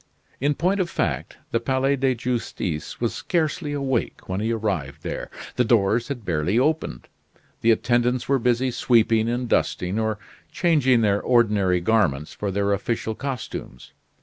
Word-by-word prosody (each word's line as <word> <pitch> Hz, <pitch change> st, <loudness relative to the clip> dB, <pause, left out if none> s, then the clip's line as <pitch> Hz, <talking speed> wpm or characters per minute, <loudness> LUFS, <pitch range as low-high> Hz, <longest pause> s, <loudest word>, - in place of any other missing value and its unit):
In 145 Hz, +2 st, +1 dB
point 185 Hz, +6 st, +1 dB
of 180 Hz, -2 st, 0 dB
fact, 70 Hz, -, -2 dB
the 115 Hz, -, +2 dB
Palais 130 Hz, +3 st, +1 dB
de 135 Hz, -1 st, +1 dB
Justice 115 Hz, -10 st, -3 dB
was 120 Hz, -1 st, 0 dB
scarcely 160 Hz, -2 st, -1 dB
awake 135 Hz, -4 st, -2 dB
when 95 Hz, +1 st, -2 dB
he 110 Hz, +2 st, 0 dB
arrived 95 Hz, -12 st, -2 dB
there. -, -, -4 dB, 0.3 s
The 125 Hz, -, +4 dB
doors 115 Hz, 0 st, +2 dB
had 125 Hz, -6 st, -5 dB
barely 85 Hz, +4 st, 0 dB
opened. 150 Hz, -, 0 dB, 0.5 s
The 115 Hz, -, +3 dB
attendants 120 Hz, +2 st, +2 dB
were 135 Hz, -1 st, +2 dB
busy 125 Hz, +2 st, +1 dB
sweeping 115 Hz, -2 st, +3 dB
and 120 Hz, +1 st, -1 dB
dusting; 95 Hz, -2 st, 0 dB
or 110 Hz, -1 st, 0 dB, 0.3 s
changing 140 Hz, -9 st, +3 dB
their 100 Hz, -2 st, +2 dB
ordinary 105 Hz, -7 st, +3 dB
garments 85 Hz, -8 st, +1 dB
for 105 Hz, -, -3 dB
their 100 Hz, +1 st, +1 dB
official 110 Hz, +2 st, -2 dB
costumes. 125 Hz, -, -6 dB
115 Hz, 150 wpm, -24 LUFS, 100-130 Hz, 0.5 s, The